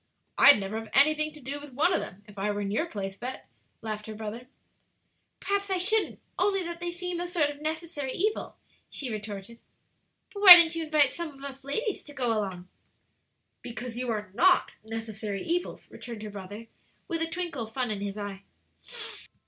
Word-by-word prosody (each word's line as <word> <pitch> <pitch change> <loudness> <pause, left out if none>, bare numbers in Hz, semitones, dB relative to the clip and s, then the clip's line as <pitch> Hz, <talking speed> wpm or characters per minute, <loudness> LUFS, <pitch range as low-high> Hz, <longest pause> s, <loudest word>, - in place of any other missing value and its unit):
"I'd 285 - +8
never 200 +3 -3
have 225 -1 -9
anything 305 +2 +4
to 300 - -11
do 280 +2 -5
with 290 -2 -11
one 320 +8 +3
of - - +2
them 190 +3 -8
if 205 -1 -11
I 205 +2 0
were 205 0 -1
in 200 -1 -2
your 310 +11 0
place, 195 -6 -5
Bet," 255 +3 -6 0.4
laughed 215 -1 -5
her 215 - -6
brother. 220 +3 -6 0.9
"Perhaps 400 0 -1
I 380 - +1
shouldn't, 410 +4 +2 0.2
only 390 -2 +2
that 340 0 -6
they 350 0 -3
seem 355 0 -4
a 350 - -2
sort 325 -5 +1
of 290 0 -12
necessary 310 -3 -3
evil," 425 +8 -1 0.3
she 260 -4 -3
retorted. 210 +1 -7 0.7
"But 405 - -6
why 380 -3 +15
don't 335 -1 +5
you 330 -1 -2
invite 300 -4 +4
some 340 -1 -4
of 275 -2 -14
us 275 -1 -8
ladies 420 - -2
to 290 - -10
go 250 -4 0
along?" 190 -4 -3 0.9
"Because 235 0 -7
you 250 0 -3
are 210 -3 -3
not 365 - +4
necessary 220 -3 -5
evils," 350 +2 -2
returned 230 -3 -8
her 210 - -6
brother, 205 +3 -8 0.4
with 330 -3 -2
a 325 - +2
twinkle 335 -9 -3
of 220 - -15
fun 250 -3 -1
in 205 -2 -3
his 200 0 -4
eye. 200 -2 -5
265 Hz, 195 wpm, -28 LUFS, 215-335 Hz, 0.9 s, why